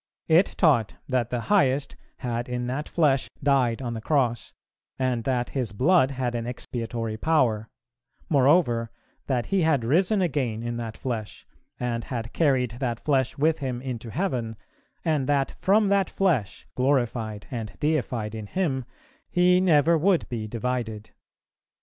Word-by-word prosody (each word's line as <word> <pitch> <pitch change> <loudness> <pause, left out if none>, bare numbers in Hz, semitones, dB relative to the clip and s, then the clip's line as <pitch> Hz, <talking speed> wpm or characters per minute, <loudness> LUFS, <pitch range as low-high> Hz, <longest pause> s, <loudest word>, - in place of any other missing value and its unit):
It 165 +4 +4
taught 135 - +3
that 125 -3 0
the 120 -1 -2
Highest 140 - +2 0.2
had 120 -1 -3
in 125 0 -2
that 130 +5 -3
flesh 145 -5 +2
died 135 -3 +2
on 120 -2 -3
the 110 - -5
Cross, 120 -4 0 0.5
and 130 -3 0
that 125 -2 0
His 125 -7 -3
blood 135 - +4
had 130 -3 -2
an 120 -1 -3
expiatory 115 -2 -4
power; 115 -7 +1 0.6
moreover, 135 -5 +3 0.4
that 125 -3 0
He 195 -2 +1
had 150 -7 +2
risen 185 - +3
again 130 - -1
in 120 0 -3
that 115 -2 -5
flesh, 110 -6 -5 0.3
and 120 -2 -2
had 115 -2 -5
carried 130 -7 +1
that 120 -4 -2
flesh 135 -4 +1
with 155 +3 +2
Him 130 -3 -3
into 125 -3 -5
heaven, 125 - -2 0.5
and 150 -4 +1
that 140 -2 +2
from 205 +2 +2
that 200 -1 +2
flesh, 160 - 0
glorified 120 -5 0
and 115 -5 -5
deified 125 -8 -1
in 110 -2 -6
Him, 135 - -1 0.4
He 180 0 +4
never 165 -2 +4
would 180 +1 +2
be 110 -3 -4
divided. 115 -2 -3
130 Hz, 150 wpm, -25 LUFS, 115-150 Hz, 0.6 s, It